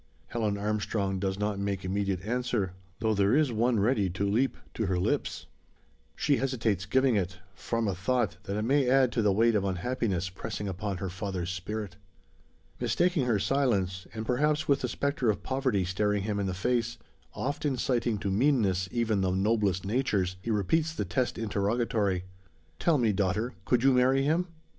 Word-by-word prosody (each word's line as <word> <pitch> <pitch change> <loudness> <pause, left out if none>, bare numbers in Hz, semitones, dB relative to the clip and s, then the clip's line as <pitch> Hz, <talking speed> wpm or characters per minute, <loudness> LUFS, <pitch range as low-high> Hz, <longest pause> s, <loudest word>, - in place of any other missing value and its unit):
Helen 110 -3 -1
Armstrong 100 -2 -1
does 95 0 -1
not 105 -1 -1
make 100 -1 -2
immediate 95 -1 -1
answer, 115 -4 -1 0.3
though 110 -1 +2
there 100 +3 +3
is 150 -3 +3
one 115 0 +2
ready 105 -2 +2
to 100 +3 -1
leap 120 +7 +1 0.2
to 110 - -1
her 95 -1 +1
lips. 90 - -1 0.7
She 140 - +2
hesitates 110 -8 -1
giving 130 +2 +3
it, 95 0 -1 0.2
from 115 +1 -2
a 100 - 0
thought, 120 +7 0
that 100 +1 -3
it 105 - -1
may 135 +2 +2
add 130 -1 +4
to 115 - 0
the 105 -2 +3
weight 115 +4 +3
of 105 -2 +1
unhappiness 95 -1 -1
pressing 105 +2 -5
upon 95 +1 -3
her 95 +1 -3
father's 90 -1 -3
spirit. 100 +1 -5 0.8
Mistaking 175 -7 +1
her 115 -3 +3
silence, 100 -7 0
and 110 0 -5
perhaps 150 +5 +1
with 140 -1 +3
the - - 0
spectre 140 -4 0
of 105 - -1
poverty 130 -8 0
staring 105 +2 0
him 105 -1 -1
in 100 - -1
the 95 - -2
face 115 +4 0 0.4
oft 145 +4 -3
inciting 125 -5 0
to 100 -1 -2
meanness, 100 -6 +2
even 115 -4 +1
the 95 - +1
noblest 95 -1 +1
natures 100 -5 0
he 115 - -5
repeats 155 - +1
the 105 - -2
test 120 +8 -1
interrogatory: 105 -2 0 0.6
"Tell 165 -3 +3
me, 115 -5 +2
daughter! 105 +5 0
Could 125 -1 +2
you 135 0 +5
marry 130 +2 +4
him?" 165 +5 +1
105 Hz, 175 wpm, -29 LUFS, 95-125 Hz, 0.8 s, you